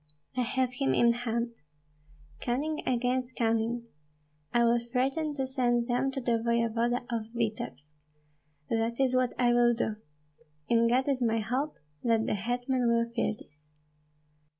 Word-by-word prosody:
I 255 - +1
have 250 +1 0
him 275 - +2
in 235 0 +5
hand. 235 0 -2 0.9
Cunning 290 - -1
against 255 +1 0
cunning! 230 +1 0 0.7
I 240 0 +3
will 235 0 +4
threaten 270 +6 -1
to 265 -1 -1
send 240 -2 +1
them 245 +3 +1
to 270 - -2
the 235 -2 +1
voevoda 235 +1 +1
of 225 0 -4
Vityebsk. 215 -10 -3 0.8
That 230 +1 0
is 260 -1 +2
what 255 -1 +1
I 240 -1 +3
will 240 0 +4
do. 220 -2 -1 0.7
In 230 0 +4
God 255 +3 +2
is 270 -2 +1
my 225 -1 +2
hope, 255 +7 -1 0.3
that 225 -2 +2
the - - 0
hetman 245 +4 0
will 235 0 +1
fear 225 - +1
this." 150 0 -19
240 Hz, 150 wpm, -29 LUFS, 230-255 Hz, 0.9 s, in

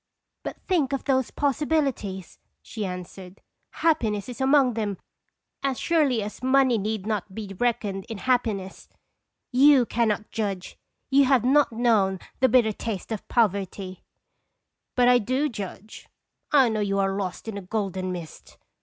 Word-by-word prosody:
" - - -57
"But - - -5
think 310 -8 +1
of 275 - -2
those 260 -3 +1
possibilities!" 275 - -1 0.2
she 215 -3 -5
answered; 180 +1 -8 0.5
"happiness 215 -11 +1
is 250 +2 -7
among 265 -2 +4
them 210 -3 -2 0.6
as 270 -2 -1
surely 290 -10 +2
as 210 - -7
money 260 -2 +3
need 210 -1 -3
not 210 -3 -3
be 205 -3 -6
reckoned 215 -5 -1
in 225 - -5
hap 250 +3 +2
piness, 195 -4 -5 0.7
^fou 265 -1 +6
cannot 215 -2 0
judge; 200 -5 -3 0.4
you 275 +1 +6
have 260 -3 +3
not 280 +1 +4
known 220 -5 +2 0.2
the 260 0 +4
bitter 235 -4 +4
taste 210 -1 -5
of 220 - -4
poverty 195 -4 -1 0.5
" - - -56
But 245 -1 +4
I 245 0 +6
do 255 +7 0
judge. 205 -1 -8 0.4
1 265 -6 +4
know 215 - -1
you 200 -1 0
are 195 0 +1
lost 195 +1 -4
in 220 - -4
a 200 - -5
golden 190 -2 -3
mist. 170 -3 -9
220 Hz, 155 wpm, -25 LUFS, 195-260 Hz, 0.7 s, ^fou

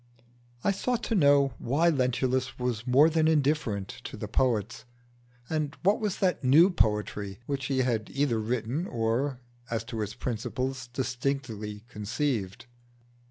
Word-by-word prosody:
I 200 - +3
sought 240 +5 -1
to - - -1
know 140 - +4
why 150 +8 +2
Lentulus 130 -1 0
was 125 -1 -2
more 135 +5 +6
than 160 -1 +2
indifferent 145 -10 +1 0.2
to - - -6
the - - -5
poets, 115 -3 0 0.6
and 155 -3 -2
what 200 +3 +4
was 210 -3 -1
that 185 -6 0
new 155 +9 +6
poetry 105 - 0
which 140 -1 -3
he 135 -2 +1
had 115 -4 -1
either 135 -5 +1
written 120 - -2
or, 120 +4 -1 0.3
as 115 -1 -2
to 115 -1 -5
its 105 +1 -4
principles, 125 +2 -3
distinctly 120 -4 -3
conceived. 105 -2 -2
130 Hz, 140 wpm, -28 LUFS, 115-145 Hz, 0.6 s, more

